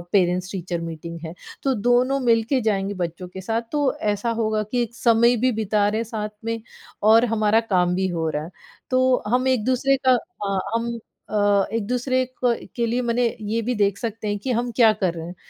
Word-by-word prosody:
Parents 180 -1 +2
teacher 175 -3 -3
meeting 165 0 -6
है 160 +1 -6 0.3
तो 270 -1 +1
दोनों 245 +4 +2
मिल 230 -3 +3
के 260 +3 +1
जाएँगे 205 -3 0
बच्चों 180 0 -4
के 190 +1 -8
साथ 225 +5 -1
तो 290 -3 +2 0.2
ऐसा 205 +3 -2
होगा 215 -1 +1
कि 240 +4 -1
एक 235 0 -5
समय 235 +1 +4
भी 255 - +4
बिता 215 -2 +1
रहे 215 +1 -1
हैं 230 - -1
साथ 215 -2 -4 0.2
में 230 0 -2 0.5
और 225 +2 +7
हमारा 220 -1 +2
काम 180 -5 +1
भी 190 +1 0
हो 165 -3 -1
रहा 150 0 -3
है। 165 - -9 0.4
तो 255 0 +3
हम 250 +3 +1
एक-दूसरे 260 +2 +2
का - - +8 0.3
अ, 195 -1 0 0.2
हम 230 +1 0 0.4
अ, 205 -2 +3
एक-दूसरे 250 +4 0 0.2
क 240 -1 +1
के 235 -1 +1
लिए 240 +2 0
मने 240 0 +1 0.2
ये 230 +1 +1
भी 245 +3 -1
देख 200 -2 +1
सकते 225 -2 -4
हैं 205 0 -1
कि 250 +6 -2
हम 240 +1 -1
क्या 225 -3 +6
कर 190 -5 -1
रहे 165 -1 -6
हैं 175 - -8
220 Hz, 210 wpm, -23 LUFS, 195-245 Hz, 0.5 s, का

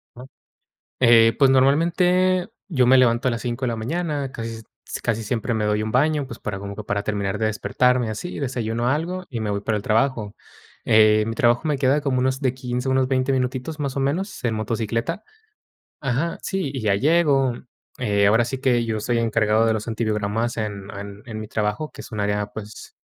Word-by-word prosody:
Ajá. 125 +2 -10 0.7
Eh, 115 -2 +6
pues, 135 -2 +5
normalmente 175 +7 +3 0.2
yo 130 -8 +2
me 130 +1 +6
levanto 120 0 +3
a - - +2
las 115 -1 -3
5 120 +2 -3
de 125 - +1
la 115 - -2
mañana, 145 +3 -2
casi 115 -1 -6 0.2
s - - -5
casi 115 -1 -1
siempre 115 +2 -2
me 110 -2 0
doy 105 0 +1
un 110 - -3
baño, 145 +2 +2
pues, 115 -3 -9
para, 100 -2 -4
como 100 0 -7
que 110 - -7
para 100 0 -1
terminar 100 -1 -2
de 110 - +1
despertarme 125 +3 +1
así, 110 +12 -5
desayuno 120 -3 -2
algo 175 +6 -1
y 120 -4 -5
me 110 -1 -2
voy 100 0 -1
para 110 +1 -1
el 105 - -3
trabajo. 110 -1 0 0.5
Eh, 110 -1 +5
mi 115 - -3
trabajo 120 +3 +3
me 150 - +1
queda 135 +2 +3
como, 140 -3 0
unos 130 +1 0
de 130 -3 0
15, 125 0 -3
unos 130 -1 +2
20 130 0 +1
minutitos, 130 +4 -2
más 140 -2 -3
o - - 0
menos, 165 +9 -2
en 115 -2 +1
motocicleta. 115 - -2 0.8
Ajá, 140 +5 -1
sí, 190 -8 -2
y 130 - -4
ya 105 -2 +2
llego, 140 -1 +3 0.4
eh, 100 -5 +2
ahora 110 +3 +4
sí 130 +3 -4
que, 125 -3 +2
yo 110 -2 -2
soy 120 +2 0
encargado 110 -1 +2
de 110 - +2
los 110 +1 -4
antibiogramas 110 +1 -1
en 100 -3 -4 0.4
en 110 -2 -6
mi 110 - -6
trabajo, 105 +9 -2
que - - -9
es - - -12
un 105 - -5
área, 105 0 0
pues, 105 0 -10
120 Hz, 205 wpm, -23 LUFS, 110-135 Hz, 0.8 s, Eh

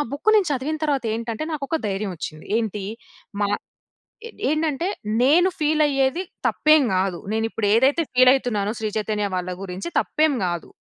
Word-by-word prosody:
Book 300 +10 +1
నేను 395 -5 +2
చదివిన 285 +4 -2
తరవాతేంటంటే, 230 -3 -2
నాకొక 305 +2 -2
ధైర్యం 195 -1 -2
వచ్చింది. 155 -1 -7
ఏంటి? 210 -3 -3 0.6
మా 205 - +2 0.8
ఏ - - -10 0.2
ఏంటంటే, 310 +2 0 0.3
నేను 325 +8 +5
ఫీలయ్యేది 295 0 +2 0.2
తప్పేం 305 -1 +4
గాదు. 185 -2 0
నేనిప్పుడేదైతే 225 +6 +2
ఫీల్ 255 0 +6
అయితునానో, 215 -6 -1
శ్రీ 220 -1 -2
చైతన్య 210 -1 -1
వాళ్ళ 180 0 -3
గురించి 185 - -5
తప్పేం 310 -2 +1
గాదు. 175 -1 -3
250 Hz, 135 wpm, -23 LUFS, 210-305 Hz, 0.8 s, ఫీల్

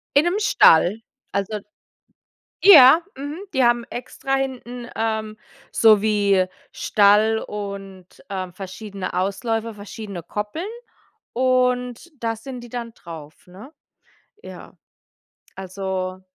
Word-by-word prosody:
In 285 +3 +5
'nem 360 +4 +1
Stall. 200 - +4 0.3
Also 205 +2 -2 1.0
Ja, 315 -6 +9 0.2
mhm, 285 +4 -6 0.2
die 260 -1 +3
haben 240 0 +3
extra 270 +3 -4
hinten, 250 -2 -4
ähm, 220 -1 -2 0.3
so 215 -3 +5
wie 200 -3 +2 0.3
Stall 210 +2 +3
und, 195 -3 -7 0.2
ähm, 185 -2 -5
verschiedene 195 +1 -7
Ausläufer, 220 +5 -2
verschiedene 205 -3 -8
Koppeln. 210 - -5 0.6
Und 250 +3 0
da 225 -1 -1
sind 250 +3 -8
die 240 - -11
dann 235 -1 -6
drauf, 160 -4 -12
ne? 195 - -13 0.7
Ja. - - -12 0.8
Also, 185 -1 -4
220 Hz, 105 wpm, -22 LUFS, 195-250 Hz, 1.0 s, Ja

